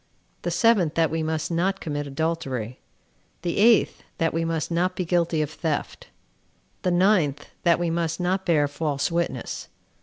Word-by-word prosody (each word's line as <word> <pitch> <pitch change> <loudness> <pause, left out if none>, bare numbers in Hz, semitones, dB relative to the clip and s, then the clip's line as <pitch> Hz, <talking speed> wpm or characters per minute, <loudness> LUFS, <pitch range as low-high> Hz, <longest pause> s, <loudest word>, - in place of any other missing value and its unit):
The - - -2
seventh 175 -2 +3
that 165 -2 +2
we 160 0 -1
must 160 +1 -2
not 190 +4 0
commit 145 -2 -3
adultery. 135 -6 -3 0.6
The 175 +1 -1
eighth, 225 +1 +4 0.2
that 165 -2 +1
we 165 +1 0
must 165 0 -2
not 180 +2 +1
be 185 - -2
guilty 170 -2 +1
of 150 - -5
theft. 160 -2 -3 0.7
The - - +1
ninth, 175 -6 +2
that 170 -2 +4
we 175 -1 -1
must 165 0 -1
not 185 +2 0
bear 155 -5 +3
false 145 0 -2
witness. 170 -7 -2
165 Hz, 160 wpm, -25 LUFS, 155-175 Hz, 0.7 s, eighth